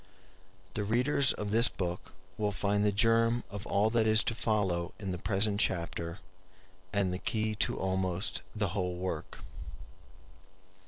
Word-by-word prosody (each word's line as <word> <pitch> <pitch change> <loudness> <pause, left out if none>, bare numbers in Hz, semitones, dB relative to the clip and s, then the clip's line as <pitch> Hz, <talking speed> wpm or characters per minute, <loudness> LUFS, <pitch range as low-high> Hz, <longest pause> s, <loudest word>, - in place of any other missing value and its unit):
The 105 - -1
readers 125 +6 +2
of 105 -1 -4
this 115 +2 +6
book 90 -1 -5 0.2
will 105 -1 0
find 100 0 0
the 105 - +3
germ 115 +2 +3
of 100 -1 -6
all 105 +2 +2
that 115 -1 +2
is 110 0 +4
to - - 0
follow 95 -7 -1
in 95 -3 -4
the 90 - -4
present 100 +2 0
chapter, 85 -1 -1 0.7
and 100 -3 +1
the 90 - -3
key 110 +2 -1
to - - 0
almost 95 0 -1
the 105 -3 0
whole 90 -2 -2
work. 90 -3 -5
100 Hz, 150 wpm, -31 LUFS, 95-110 Hz, 0.7 s, this